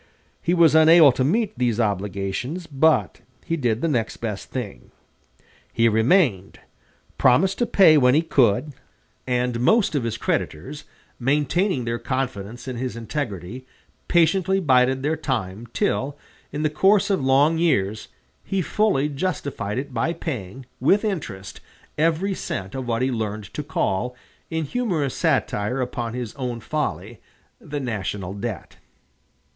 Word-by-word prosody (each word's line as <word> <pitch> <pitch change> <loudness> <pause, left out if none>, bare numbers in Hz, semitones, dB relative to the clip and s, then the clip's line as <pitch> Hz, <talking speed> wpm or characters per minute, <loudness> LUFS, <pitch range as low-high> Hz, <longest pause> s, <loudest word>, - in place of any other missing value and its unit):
He 175 - +1
was 170 -3 +5
unable 160 -1 +7
to 130 - -1
meet 210 - 0
these 120 -3 +1
obligations, 105 - -2
but 135 - +1 0.2
he 165 - -1
did 120 -6 -1
the 165 - +1
next 120 -8 -1
best 105 -4 -5
thing. 120 -7 -6 0.8
He 115 0 +3
remained, 110 - +2 0.6
promised 185 +10 +3
to 240 - +1
pay 165 -8 +6
when 125 0 +4
he 160 - +3
could, 140 -2 +2 0.5
and 125 -1 0
most 200 - +3
of 140 -5 0
his 115 -2 -2
creditors, 130 - -3 0.3
maintaining 145 - +1
their 115 0 -2
confidence 120 -2 -4
in 130 -2 -4
his 125 0 -4
integrity, 115 - -5 0.4
patiently 180 +3 +3
bided 130 -4 +3
their 155 +2 +1
time, 115 -8 -3
till, 145 - -1 0.3
in 150 +2 -3
the 155 - +1
course 195 +5 +3
of 190 -8 0
long 140 +5 +3
years, 110 - 0 0.4
he 195 -2 -1
fully 200 -8 +1
justified 140 - -3
it 135 0 -4
by 125 +8 0
paying, 130 - -6
with 195 - +3
interest 115 - -5 0.4
every 165 +5 +1
cent 95 - -5
of 130 -2 -5
what 115 +1 0
he 130 - +1
learned 105 -6 -4
to - - -3
call, 125 +7 -2 0.3
in 160 -1 -2
humorous 165 - -1
satire 105 +6 0
upon 120 -2 -3
his 125 -3 -5
own 125 -3 -3
folly, 110 - -4 0.4
the 145 -1 -5
"national 105 -6 -4
debt." 100 -2 -6
130 Hz, 140 wpm, -23 LUFS, 115-160 Hz, 0.8 s, unable